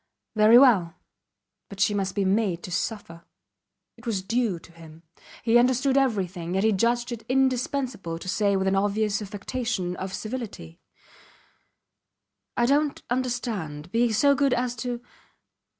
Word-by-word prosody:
Very 215 +2 +7
well 200 -11 +5 0.7
but 200 - -10
she 205 +1 +3
must 195 -2 -2
be 200 -2 +1
made 190 -3 0
to 180 - -7
suffer. 175 -4 -4 0.7
It 230 +1 -13
was 200 -5 -1
due 225 -2 0
to 170 - -16
him. 165 -1 -15 0.4
He 235 +1 +5
understood 260 +2 +2
everything, 190 -9 0
yet 190 - +1
he 220 - +4
judged 235 +4 +1
it 230 -2 -6
indispensable 255 -8 0
to 170 - -10
say 200 +1 +1
with 190 0 0
an 190 - +2
obvious 205 +1 0
affectation 205 -2 -3
of 190 0 -5
civility: 215 - -6 1.8
I 240 - +3
dont 285 +3 +1
understand 225 - -3
be 235 +1 +2
so 280 +7 +4
good 275 -2 +2
as 245 0 -1
to 240 +1 -4
215 Hz, 145 wpm, -25 LUFS, 190-245 Hz, 1.8 s, Very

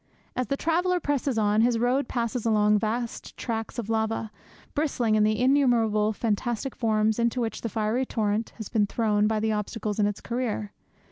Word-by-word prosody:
As 255 - -1
the 275 - -1
traveller 355 +4 +1
presses 280 -5 -1
on, 210 0 +3
his 235 0 +3
road 245 +3 +1
passes 235 -1 -2
along 210 -2 +3
vast 230 +2 -3
tracts 225 -1 -4
of 235 -4 -3
lava, 220 -1 -1 0.4
bristling 265 -7 0
in 215 - +4
the 215 0 +2
innumerable 240 -5 +3
fantastic 235 +4 -2
forms 220 -1 +1
into 235 +1 +1
which 230 -2 -2
the 230 - -3
fiery 225 +5 0
torrent 215 0 -1
has 220 -3 -6
been 210 -3 +1
thrown 210 -1 +1
by 220 0 +1
the 220 +1 0
obstacles 210 0 -3
in 205 - +4
its 205 - -3
career. 235 -4 -3
225 Hz, 180 wpm, -26 LUFS, 215-245 Hz, 0.4 s, in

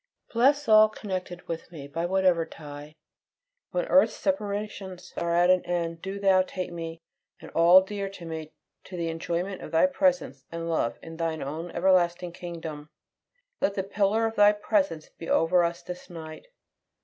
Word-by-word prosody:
Bless 280 +5 +3
all 215 0 +7
connected 185 -4 -6
with 165 +1 -5
me, 145 -5 -8
by 165 +4 -2
whatever 185 -2 +3
tie. 150 -1 -10 0.7
When - - -1
earth's - - +4
separations 205 -7 -3
are 170 - -1
at 175 +1 +5
an 185 -1 +3
end, 170 -2 -2
do 195 +1 -5
Thou 190 -2 +5
take 185 -1 -4
me 165 -1 -6 0.4
and - - -11
all 175 +3 +7
dear 200 0 -4
to 190 -3 -10
me 160 -1 -6 0.3
to 185 - -8
the 170 -1 -1
enjoyment 170 +4 -3
of - - -7
Thy 165 - +4
presence 270 - +1
and 165 0 -4
love 120 -8 0
in 165 0 -9
Thine 165 -2 -2
own 155 +5 -5
everlasting 175 -1 +2
kingdom. 165 -4 -7 0.7
Let 200 - 0
the 190 - -1
pillar 205 +3 +1
of 225 0 -2
Thy 205 0 +6
presence 210 - 0
be 165 - -7
over 175 +2 +4
us 170 0 -2
this 180 0 -8
night. 160 - -9
175 Hz, 170 wpm, -27 LUFS, 165-195 Hz, 0.7 s, all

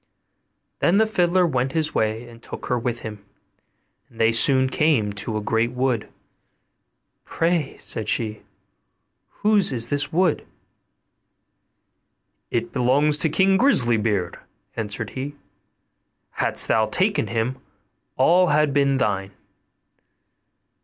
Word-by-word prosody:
Then 175 +3 +3
the 220 - +4
fiddler 185 -4 +2
went 130 -4 -1
his 160 -2 -1
way, 110 +2 -1
and 115 -1 -15
took - - -8
her 125 - -1
with 120 0 -3
him, 105 -2 -8 0.9
and 115 - -19
they 115 0 +4
soon 130 +3 +4
came 130 -8 +1
to 110 +2 -4
a - - -3
great 115 +3 0
wood. 125 -3 -1 1.1
'Pray,' 165 -3 -1
said 110 - -4
she, 110 -2 -2 0.9
'whose 210 -2 +2
is 120 -2 -1
this 145 0 -1
wood?' 180 +3 +1 2.1
'It 115 0 -3
belongs 140 +4 +2
to 160 - +1
King 190 +5 +3
Grisly 125 - +3
beard,' 105 -5 -2 0.4
answered 105 -1 -4
he; 140 +3 -6 1.0
'hadst - - 0
thou 110 -1 +2
taken 200 - 0
him, 115 +3 -2 0.6
all 175 +7 +4
had 150 -2 +2
been 140 -1 +2
thine. 100 -7 -1
130 Hz, 120 wpm, -22 LUFS, 115-155 Hz, 2.1 s, the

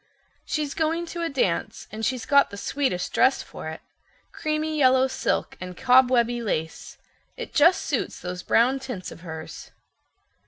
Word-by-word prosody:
"She's 300 -2 -2
going 325 +2 0
to 345 - -4
a 335 - -1
dance, 225 -11 -1
and 220 +1 -6
she's 250 0 -1
got 280 -1 +4
the 200 - -9
sweetest 200 -6 -2
dress 260 - +3
for - - -9
it—creamy 310 - -5
yellow 260 -1 +5
silk 265 - -1
and 180 -1 -7
cobwebby 245 -2 +4
lace. 160 -7 -4 0.4
It - - -7
just 335 +5 +5
suits - - -2
those 180 0 -5
brown 250 +7 +3
tints 250 -9 -6
of - - -12
hers." 160 -2 -8
255 Hz, 150 wpm, -25 LUFS, 185-285 Hz, 0.4 s, yellow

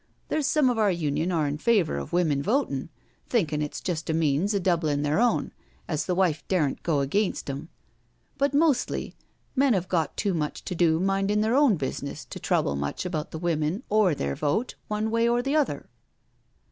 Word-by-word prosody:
There's 305 -2 0
some 300 -3 +3
of 235 - -2
our 210 -2 +4
Union 160 -1 -1
are 160 -4 +1
in 145 +1 -2
favour 200 - +2
of 70 - -7
Women 160 -6 +2
Votin', 160 - 0 0.4
thinkin' 160 -11 0
it's 150 - -3
just 170 -4 -3
a 160 - +1
means 160 +4 +1
of 195 - 0
doublin' 160 -5 +1
their 150 +5 +1
own, 245 0 +2 0.4
as 155 -2 -2
the 180 - +1
wife 175 -5 +1
daren't 155 -8 0
go 155 -5 +1
against 195 +9 0
'em 145 +4 -7 0.3
— - - -41
but 280 0 +2
mostly 290 -2 +1 0.4
men 270 -1 +4
have 185 -2 -1
got 165 -3 -1
too 200 -2 0
much 150 -3 -3
to - - -3
do 165 -2 +3
mindin' 195 +2 +1
their 220 +2 +1
own 275 -7 +5
business 140 -1 -4
to - - -8
trouble 70 - +1
much 70 - -3
about 160 -4 -3
the - - -6
women 165 - -1
or 210 -7 +4
their 70 - -2
votej 180 - -1
one 215 +1 -1
way. 230 +1 +2
or 240 +1 +1
the 275 +3 0
other. 300 -3 0
175 Hz, 195 wpm, -26 LUFS, 150-215 Hz, 0.4 s, own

